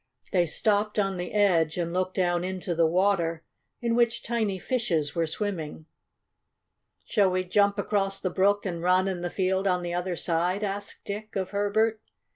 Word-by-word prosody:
They 175 Hz, -2 st, +3 dB
stopped 210 Hz, +5 st, 0 dB
on 195 Hz, -2 st, +1 dB
the 180 Hz, 0 st, -4 dB
edge, 180 Hz, -7 st, +3 dB
and 170 Hz, -1 st, -2 dB
looked 185 Hz, 0 st, -1 dB
down 175 Hz, -1 st, +1 dB
into 185 Hz, -1 st, -3 dB
the 165 Hz, -1 st, +3 dB
water 170 Hz, -2 st, +1 dB, 0.4 s
in 235 Hz, -1 st, 0 dB
which 235 Hz, -1 st, +2 dB
tiny 220 Hz, -5 st, -1 dB
fishes 175 Hz, -, -1 dB
were 165 Hz, -1 st, 0 dB
swimming. 160 Hz, -5 st, -4 dB, 1.2 s
"Shall 200 Hz, -4 st, +3 dB
we 185 Hz, 0 st, 0 dB
jump 200 Hz, +2 st, +2 dB
across 195 Hz, -1 st, 0 dB
the 185 Hz, -, -2 dB
brook 200 Hz, +3 st, +2 dB
and 170 Hz, -3 st, -3 dB
run 185 Hz, +2 st, +3 dB
in 185 Hz, -2 st, -2 dB
the 175 Hz, -, -2 dB
field 190 Hz, +1 st, 0 dB
on 180 Hz, -1 st, +1 dB
the 175 Hz, 0 st, -3 dB
other 175 Hz, 0 st, -2 dB
side?" 175 Hz, +4 st, 0 dB
asked 200 Hz, 0 st, -4 dB
Dick 210 Hz, +1 st, -6 dB
of 190 Hz, -2 st, -2 dB
Herbert. 215 Hz, +2 st, +1 dB
190 Hz, 175 wpm, -27 LUFS, 175-205 Hz, 1.2 s, They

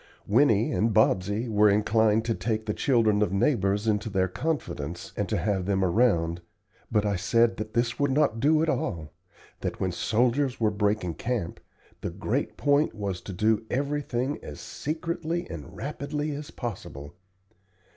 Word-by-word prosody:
Winnie 115 Hz, -1 st, +3 dB
and 110 Hz, 0 st, +1 dB
Bobsey 105 Hz, +2 st, +2 dB
were 105 Hz, -1 st, +4 dB
inclined 110 Hz, +1 st, +3 dB
to 115 Hz, -, +1 dB
take 110 Hz, +3 st, -2 dB
the 105 Hz, -, -1 dB
children 110 Hz, -6 st, +2 dB
of 105 Hz, -, +2 dB
neighbors 100 Hz, -2 st, +1 dB
into 105 Hz, 0 st, +1 dB
their 95 Hz, -2 st, +1 dB
confidence, 90 Hz, -, -4 dB
and -, -, -2 dB
to -, -, 0 dB
have 95 Hz, -3 st, -1 dB
them 95 Hz, -1 st, +2 dB
around, 85 Hz, -5 st, +2 dB, 0.5 s
but 105 Hz, -2 st, +2 dB
I 100 Hz, -1 st, +1 dB
said 115 Hz, +5 st, +2 dB
that 110 Hz, +1 st, -6 dB
this 120 Hz, +2 st, 0 dB
would 140 Hz, 0 st, +2 dB
not 135 Hz, -4 st, +2 dB
do 155 Hz, +4 st, +3 dB
at -, -, 0 dB
all 85 Hz, -, -2 dB, 0.5 s
that -, -, -4 dB
when 95 Hz, -, 0 dB
soldiers 125 Hz, +8 st, +1 dB
were 110 Hz, -2 st, +2 dB
breaking 100 Hz, -4 st, 0 dB
camp 115 Hz, -4 st, -3 dB, 0.4 s
the -, -, -2 dB
great 105 Hz, +10 st, -2 dB
point 145 Hz, -2 st, +2 dB
was 100 Hz, -4 st, -3 dB
to -, -, -8 dB
do 110 Hz, +4 st, +1 dB
everything 140 Hz, -1 st, -1 dB
as 75 Hz, -, -9 dB
secretly 165 Hz, +2 st, -3 dB
and 75 Hz, -5 st, -8 dB
rapidly 145 Hz, +2 st, -3 dB
as 145 Hz, +2 st, -6 dB
possible. 75 Hz, -, -7 dB
110 Hz, 160 wpm, -27 LUFS, 100-130 Hz, 0.5 s, were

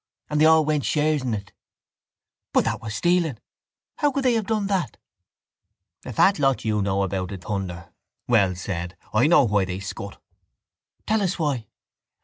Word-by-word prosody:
And 150 Hz, 0 st, +1 dB
they -, -, +7 dB
all 160 Hz, -1 st, +6 dB
went 150 Hz, -2 st, 0 dB
shares 150 Hz, -1 st, +1 dB
in 125 Hz, -4 st, -1 dB
it. 100 Hz, -1 st, -8 dB, 1.0 s
—But -, -, +3 dB
that -, -, -2 dB
was 110 Hz, -2 st, -5 dB
stealing. 175 Hz, -5 st, +1 dB, 0.6 s
How 290 Hz, -2 st, +2 dB
could 275 Hz, 0 st, -2 dB
they 250 Hz, -, +4 dB
have 220 Hz, -4 st, -1 dB
done 215 Hz, -2 st, 0 dB
that? 185 Hz, -, -1 dB, 1.1 s
—A -, -, -5 dB
fat 190 Hz, -, +3 dB
lot 135 Hz, -4 st, +1 dB
you 105 Hz, -1 st, +1 dB
know 100 Hz, 0 st, 0 dB
about 95 Hz, -1 st, -3 dB
it, 95 Hz, -2 st, -7 dB
Thunder! 95 Hz, -5 st, -5 dB, 0.3 s
Wells 95 Hz, -7 st, +2 dB
said. 85 Hz, 0 st, -4 dB, 0.2 s
I 115 Hz, +6 st, +4 dB
know 170 Hz, -2 st, +6 dB
why 105 Hz, -5 st, +2 dB
they 95 Hz, 0 st, -4 dB
scut. 100 Hz, 0 st, -7 dB, 0.9 s
—Tell 220 Hz, 0 st, +1 dB
us 190 Hz, -1 st, 0 dB
why. 140 Hz, -, -1 dB
120 Hz, 170 wpm, -24 LUFS, 100-160 Hz, 1.1 s, they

